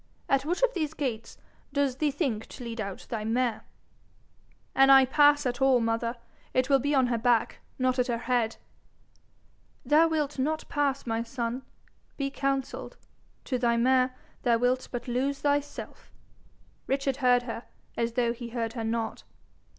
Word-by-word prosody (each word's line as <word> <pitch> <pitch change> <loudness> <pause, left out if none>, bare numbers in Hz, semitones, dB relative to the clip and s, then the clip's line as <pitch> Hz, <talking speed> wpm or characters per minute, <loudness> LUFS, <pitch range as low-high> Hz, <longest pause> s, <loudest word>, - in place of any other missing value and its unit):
At 275 0 +2
which 350 +9 -1
of - - +4
these 315 -3 -2
gates 230 -6 -4 0.4
does 280 -3 +1
thee 300 +1 +1
think 265 -7 -2
to 250 - -10
lead 230 -1 -4
out 200 -2 -6
thy 220 -2 -2
mare?' 235 +1 0 1.1
'An' 270 0 +5
I 270 -1 +8
pass 290 +2 +4
at 245 0 -2
all, 265 -2 +5
mother, 230 +1 -1 0.4
it 255 +2 +2
will 275 - +6
be 285 +3 0
on 260 -2 +4
her 240 -2 0
back, 235 -1 +2 0.2
not 255 0 +1
at 250 - +2
her 240 -2 0
head.' 235 -1 0 1.3
'Thou 305 +5 +5
wilt 300 -3 -1
not 310 +4 -1
pass, 280 -2 0
my 225 -1 -1
son. 235 +1 -3 0.6
Be 275 -1 -2
counselled. 275 -1 -2 0.5
To 255 -3 -1
thy 235 -1 +2
mare, 255 +1 +3 0.3
thou 235 -2 +3
wilt 250 +2 +1
but 245 0 -5
lose 265 +3 0
thyself.' 290 0 -2 0.8
Richard 270 0 0
heard 250 -3 +3
her 230 -1 -6 0.3
as 230 0 -1
though 235 -1 +1
he 240 0 -8
heard 230 -1 -3
her 230 -2 -4
not. 225 0 -2
255 Hz, 165 wpm, -28 LUFS, 235-275 Hz, 1.3 s, I